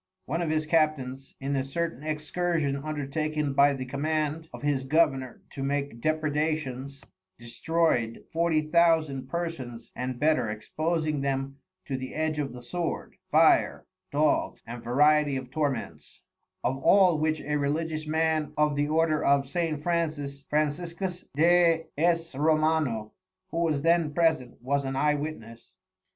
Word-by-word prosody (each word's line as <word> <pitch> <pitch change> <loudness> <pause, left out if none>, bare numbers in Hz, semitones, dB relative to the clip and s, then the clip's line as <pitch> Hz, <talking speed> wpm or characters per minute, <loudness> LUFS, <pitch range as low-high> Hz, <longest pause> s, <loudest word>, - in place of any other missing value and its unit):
One 165 +5 -2
of 170 - -1
his 155 0 0
Captains 150 -5 0
in 140 +1 -2
a 135 - 0
certain 140 -1 -3
Excursion 155 0 -1
undertaken 150 0 -2
by 140 +1 +5
the 130 -1 -5
Command 155 +3 -2
of - - -10
his 145 -2 +1
Governeur 135 -3 +1
to 135 - -7
make 140 -3 -2
Depraedations, 150 -3 -1 0.3
destroy'd 120 0 0
Forty 165 -1 +2
Thousand 155 -4 +2
Persons 150 -9 -5
and 125 0 -4
better 155 -6 +2
exposing 155 +7 -2
them 135 0 -2 0.3
to 135 - -3
the 130 0 -7
edge 155 -1 -1
of 140 -2 -2
the 125 0 -10
Sword, 170 +7 -4
Fire, - - +4 0.3
Dogs 150 +1 +1
and 115 0 -8
variety 145 +3 +3
of 130 -1 -7
Torments; 145 -2 -3 0.4
of 135 +1 0
all 175 +1 +5
which 155 0 +1
a 150 0 -1
Religious 155 +2 -2
Man 160 -1 0
of 150 -1 +2
the 145 +1 +1
Order 155 0 +2
of 140 -1 +3
St. 155 -1 -2
Francis, 150 -5 -2
Franciscus 170 +5 -2
de 165 +1 +4
S. 165 +1 +1
Romano, 155 -6 +1 0.4
who 165 - -2
was 155 -4 0
then 165 -3 +2
present 160 -8 +1
was 140 +2 0
an 135 0 -3
Eye 150 +2 +3
Witness. 140 -6 -7
150 Hz, 140 wpm, -27 LUFS, 135-160 Hz, 0.4 s, by